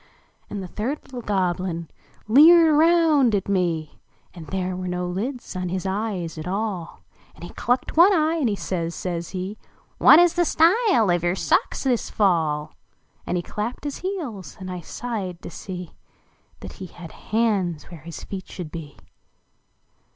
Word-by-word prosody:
LIXS - - -34
And 200 -2 -5
the - - -6
third 240 - -3
little 245 - -4
1 - - -20
(loblin 180 -3 -1 0.4
leered 315 +6 +7
round 315 -7 +4
at 195 - -1
me 170 -5 -1 0.3
And 165 -4 -10
there 185 -1 -2
were 185 0 -4
no 180 0 -2
lids 220 +9 -4
on 180 -1 -2
his 185 +1 -3
eves 190 -5 -3
at 155 - -6
all 190 -3 -3 0.3
And - - -14
he 175 - -7
chicked 245 +2 -1
one 345 +5 +7
eye, 325 -2 +2
and 275 -8 +1
he 205 - 0
says, 170 -4 -3
says 170 -2 -4
he, 190 +3 -5 0.2
" - - -34
What - - +9
is 350 0 +5
the 350 - +2
style 340 - +4
of 175 -1 +1
your 175 +1 +1
socks - - +1
this 250 -4 0
fall? 160 -7 +1 0.3
" - - -37
And 180 - 0
he 175 - -2
clapped 220 +8 -4
his 290 -2 -4
heels 285 - -5
and 185 -1 -6
I 180 - -4
sighed 195 -4 -5
to - - -7
see 180 -3 -7 0.7
That - - -8
he 185 - -5
had 170 -1 -11
hands 200 -9 -1
where 165 -4 -10
his 170 +1 -9
feet 190 -1 -7
should 170 -5 -7
be. 155 -4 -8
190 Hz, 180 wpm, -23 LUFS, 175-250 Hz, 0.7 s, What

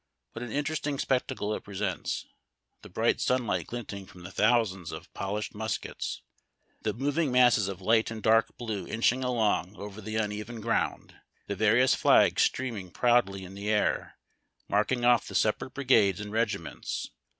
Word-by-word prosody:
What 115 - -7
an 120 -2 -5
interesting 145 0 -1
spectacle 125 -6 -1
it - - -5
presents, 100 -2 -3 0.6
the - - -12
bright - - +1
sunlight 110 -10 0
glint 120 -4 -6
ing 100 -1 -8
from 90 - -14
the 90 - -8
thousands 105 -5 +1
of - - -9
polished 105 +2 -3
muskets, 110 +1 -4 0.6
the - - 0
moving 145 +3 0
masses 125 -5 +5
of 95 -2 -5
light 110 +3 +3
and 110 0 -5
dark 115 0 +3
blue 110 -5 -4
inching 125 +3 +1
along 110 -6 0
over 105 +1 -8
the 110 +1 -5
uneven 105 +1 -3
ground, 115 +1 -1 0.3
the 100 - -3
various 110 +5 +4
flags - - +4
streaming 115 -8 -1
proudly 110 -3 +2
in 95 +1 -10
the 100 +2 -4
air, 105 -1 0 0.5
marking 120 +4 +1
oft' 120 -2 +4
the - - -8
separate 110 +4 0
brigades 110 -9 +3
and 105 -1 -6
regiments. 105 -6 -2
110 Hz, 160 wpm, -28 LUFS, 100-120 Hz, 0.6 s, masses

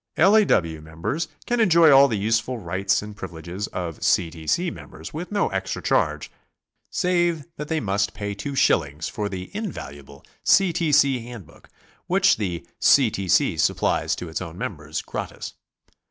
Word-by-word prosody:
L. 190 +6 +5
A. 220 - +6
W. 80 - +1
members 90 - -4 0.2
can 240 0 0
enjoy 170 -7 +6
all 140 0 +8
the 115 -5 -1
useful 115 +4 0
rights 95 +1 -1
and 105 0 -9
privileges 90 +1 -6
of 85 -4 -6
C. 85 -2 +2
T. 80 -1 -11
C. 175 - +1
members, - - -10
with 170 +6 -6
no 205 - +1
extra - - -3
charge - - 0 0.6
save 175 -4 0
that 150 - -5
they 160 0 0
must 100 -2 -1
pay 100 -1 -4
two 135 +8 -5
shillings 75 - +1
for 105 -1 -3
the 95 - -7
invaluable 70 - -7 0.2
C. 195 -3 +4
T. 165 -2 0
C. 140 -3 +4
Hand 120 -6 -9
book, - - -20 0.4
which 190 +2 +3
the 90 -5 -3
C. 130 -6 +5
T. 95 -2 -4
C. - - +3
supplies - - +1
to 90 - -7
its 80 - -4
own 85 -1 -7
members - - -5
gratis. - - -6
105 Hz, 175 wpm, -23 LUFS, -, 0.6 s, all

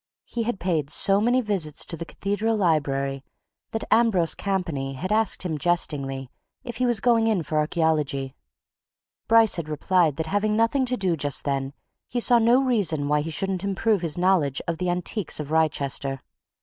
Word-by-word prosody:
He 235 - -4
had 230 -3 -2
paid 165 -5 -1
so 195 +5 +2
many 245 +3 +2
visits 190 - -2
to 170 - -3
the 165 - -6
Cathedral 205 +5 -2
Library 140 -7 0 0.5
that 225 - -4
Ambrose 210 -8 +3
Campany 170 -9 -3
had 185 +9 -5
asked 220 -3 +1
him 160 -5 -3
jestingly 140 -6 -1 0.3
if 240 -3 -6
he 255 - +1
was 240 -4 +3
going 230 0 +3
in 210 -7 +1
for 155 +1 -1
archaeology; 150 -4 0 0.9
Bryce 225 -3 +5
had 160 -2 -5
replied 160 0 +1
that 160 - -3
having 205 +5 0
nothing 230 +4 +2
to 250 0 0
do 185 -5 0
just 145 -2 -2
then 135 -1 -2 0.3
he 245 - -2
saw 240 0 +4
no 240 +4 +4
reason 175 - 0
why 150 0 +2
he 160 - -5
shouldn't 190 +3 -2
improve 200 +1 0
his 165 -2 -2
knowledge 175 -7 +2
of 165 -1 -2
the 180 - -1
antiquities 180 +1 -1
of 150 0 -6
Wrychester. 140 -4 0
175 Hz, 175 wpm, -24 LUFS, 150-215 Hz, 0.9 s, Bryce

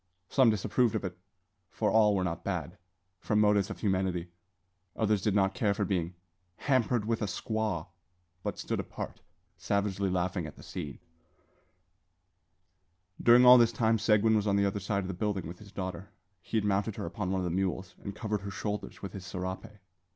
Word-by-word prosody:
Some 130 -4 +5
disapproved 110 +2 +1
of - - -1
it 90 -2 -4 0.5
(for 105 +2 0
all 105 -2 +5
were 95 - +1
not 85 -2 -3
bad) 90 -6 -3 0.4
from 105 +3 +1
motives 105 -2 +3
of - - -7
humanity. 95 -4 0 0.6
Others 105 -3 +1
did 105 0 +1
not 95 -1 +3
care 100 -1 +1
for - - 0
being 90 -3 -1 0.4
"hampered 125 -3 +1
with 115 0 -1
a - - +1
squaw," 105 -3 -2 0.6
but - - -3
stood - - -2
apart, - - -6 0.4
savagely 100 -1 0
laughing 90 -2 -1
at 75 - -10
the - - -14
scene. 75 -7 -6 2.2
During 120 +1 +7
all 125 0 +10
this 115 -1 +5
time 115 -1 +2
Seguin 110 +1 +4
was 105 -1 +1
on 100 - +3
the 100 0 +3
other 100 +1 -1
side 100 0 -1
of - - -5
the 95 - -3
building 100 -1 -2
with 85 +2 -9
his 105 -2 -13
daughter. 95 -1 -5 0.3
He 110 - -2
had 105 - +1
mounted 100 +1 0
her - - -4
upon 95 +2 -3
one 95 0 0
of - - -2
the 85 - -1
mules, 95 +1 -2
and 100 0 -5
covered 105 -2 -2
her 100 - -5
shoulders 105 +1 -5
with 100 - -5
his 95 - -7
serape. 95 +2 -4
100 Hz, 190 wpm, -30 LUFS, 95-110 Hz, 2.2 s, all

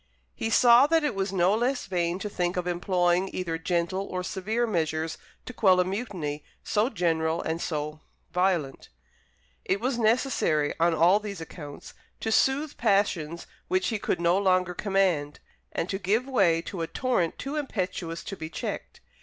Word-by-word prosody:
He 225 - -3
saw 240 +4 +6
that 325 0 +3
it 295 - 0
was 195 0 -2
no 185 0 +3
less 250 +4 0
vain 175 -2 -1
to 205 - -4
think 180 -3 -2
of 180 - -1
employing 180 +1 +1
either 165 -3 -3
gentle 175 +3 -1
or 180 0 -3
severe 215 +6 -1
measures 160 -5 -1 0.3
to 250 - -7
quell 190 -5 +4
a 180 - +3
mutiny 185 -8 -4 0.2
so 215 +4 +1
general 165 -5 0
and 165 +1 -2
so 150 -1 -3 0.3
violent. 180 -7 0 0.7
It 195 - 0
was 245 +1 -1
necessary, 220 - +2
on 170 0 +3
all 175 +6 +5
these 205 -3 -6
accounts, 150 -3 -9 0.3
to 220 - -1
soothe 275 +6 +2
passions 195 -7 +1 0.2
which 185 0 +1
he 220 - -2
could 180 - -1
no 170 +2 +3
longer 185 -2 +2
command, 180 -7 0 0.3
and 165 - -2
to 195 - -2
give 210 +6 +1
way 190 -11 +2
to 175 0 -5
a 165 - -2
torrent 215 -9 0
too 275 +3 -5
impetuous 185 - -3
to 195 - -6
be 160 -3 -7
checked. - - -6
185 Hz, 170 wpm, -27 LUFS, 170-215 Hz, 0.7 s, saw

